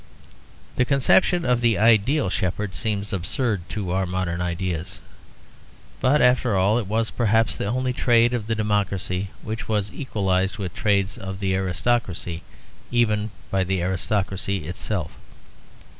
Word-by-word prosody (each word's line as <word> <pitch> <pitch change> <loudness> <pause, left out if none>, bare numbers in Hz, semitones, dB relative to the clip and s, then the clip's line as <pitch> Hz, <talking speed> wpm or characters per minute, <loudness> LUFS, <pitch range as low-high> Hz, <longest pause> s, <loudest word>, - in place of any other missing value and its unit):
The - - +4
conception 145 +7 +3
of 125 -1 +2
the 115 -3 +3
Ideal 115 +2 +3
Shepherd 95 +2 -2
seems 105 -2 -2
absurd 100 +1 -1
to 100 -5 -3
our 95 0 0
modern 90 -1 -2
ideas. 90 +1 -3 1.0
But, 140 +3 +3
after 125 -3 +3
all, 100 +5 +3
it 110 - -4
was 110 +2 0
perhaps 115 -1 +2
the - - -3
only 130 +3 0
trade 120 -1 +3
of 115 -4 -2
the 115 - 0
democracy 100 -3 -1
which 110 +1 -5
was 105 -2 -1
equalized 95 -6 -1
with 95 -4 -4
the - - -10
trades 100 -2 +1
of 95 0 -6
the 95 -2 0
aristocracy 90 -2 -1 0.5
even 110 -3 +1 0.2
by 95 -1 +2
the 95 -1 -1
aristocracy 95 -1 -1
itself. 90 0 -4
100 Hz, 145 wpm, -23 LUFS, 95-115 Hz, 1.0 s, The